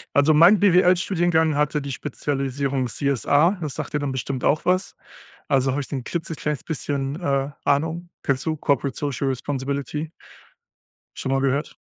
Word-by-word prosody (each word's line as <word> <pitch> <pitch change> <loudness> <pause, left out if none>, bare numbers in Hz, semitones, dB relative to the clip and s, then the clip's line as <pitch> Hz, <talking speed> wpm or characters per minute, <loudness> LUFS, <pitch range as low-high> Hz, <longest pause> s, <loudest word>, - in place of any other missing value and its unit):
Also, 145 +2 +5
mein 170 +7 +7
BWL 180 -2 +5
Studiengang 170 -4 +1
hatte 150 0 +1
die 140 -1 -5
Spezialisierung 135 -1 -2
CSA, 145 - +2
das 150 -5 -4
sagt - - -5
dir 150 - +1
dann 145 -2 -2
bestimmt 130 0 -4
auch 150 - +2
was. 185 +2 0 0.5
Also 135 -2 +2
habe 140 - -1
ich 140 - -6
da 140 - -3
'n 130 - -5
klitzekleines 155 -3 -3
bisschen, 140 -1 -3
äh, 140 -4 0
Ahnung. 165 +5 0
Kennst 135 -2 -1
du 160 -1 0
Corporate 140 -3 0
Social 140 -2 -2
Responsibility? 140 +3 -3 1.0
Schon 135 - -3
mal 135 0 +1
gehört? 140 +2 -1
145 Hz, 160 wpm, -23 LUFS, 135-160 Hz, 1.0 s, mein